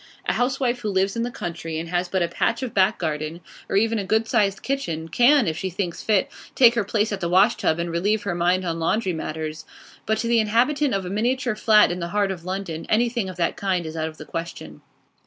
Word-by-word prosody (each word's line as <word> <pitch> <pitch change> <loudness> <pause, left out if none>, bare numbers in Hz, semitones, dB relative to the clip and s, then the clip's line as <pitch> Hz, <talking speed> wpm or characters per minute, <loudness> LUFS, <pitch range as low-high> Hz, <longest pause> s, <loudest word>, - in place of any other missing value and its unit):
A - - +1
housewife 250 -1 0
who 215 -3 -3
lives 195 +1 +1
in 230 - -1
the 240 - -1
country, 170 -6 -5
and 165 +1 -4
has 175 0 -1
but 190 -1 +1
a - - +1
patch 170 - -1
of 245 - -4
back 195 +2 +3
garden, 155 0 -3 0.3
or - - -1
even 225 +2 +2
a - - -2
good 220 +3 +1
sized 200 -2 +1
kitchen, 170 -13 -3
can, 250 - +4
if 160 - -1
she 190 - -2
thinks 180 -1 -4
fit, 210 -3 +2 0.3
take 240 -3 +7
her 230 -3 0
place 210 +2 0
at 200 - -2
the 170 - -2
wash 190 +6 +4
tub 160 - 0
and 170 0 -3
relieve 205 +6 0
her 200 - -2
mind 180 +2 +1
on 165 -1 -2
laundry 185 +3 0
matters; 155 -1 -5 0.4
but 220 0 +1
to 230 - -2
the 235 0 +3
inhabitant 250 +5 +2
of 195 -1 -2
a - - -4
miniature 245 +4 0
flat 215 -3 +5
in 175 - -3
the 170 - -3
heart 200 +1 0
of 175 -3 -7
London 185 -4 -4
anything 235 -2 +1
of 185 - -8
that 170 -1 0
kind 185 -3 -1
is 160 0 -6
out 160 0 -2
of 155 -1 -9
the 155 - -9
question. 150 - -7
195 Hz, 245 wpm, -23 LUFS, 170-225 Hz, 0.4 s, take